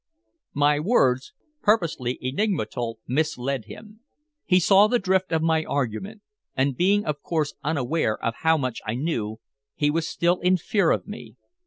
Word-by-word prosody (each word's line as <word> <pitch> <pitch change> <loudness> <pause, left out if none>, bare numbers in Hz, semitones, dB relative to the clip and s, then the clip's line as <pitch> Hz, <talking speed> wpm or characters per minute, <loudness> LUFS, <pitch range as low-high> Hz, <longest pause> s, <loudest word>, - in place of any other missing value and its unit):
My 145 +1 +3
words, 135 - +2 0.3
purposely 160 - +1
enigmatical, 130 - -2
misled 135 -3 -1
him. 215 0 -12 0.5
He 180 - +4
saw 195 +3 +5
the 245 - +2
drift 190 -3 0
of 160 -1 +1
my 160 -1 +2
argument, 145 - -3 0.3
and 135 0 +1
being 200 +7 +2
of 150 -1 -3
course 155 -3 -1
unaware 145 -5 0
of 115 - -2
how 160 0 +3
much 130 -5 -3
I 110 +1 -3
knew, 115 -7 -3 0.4
he 145 0 +1
was 165 +1 -1
still 175 +1 +1
in 185 +1 +3
fear 195 +4 +1
of - - +1
me. - - -9
155 Hz, 155 wpm, -24 LUFS, 130-185 Hz, 0.5 s, saw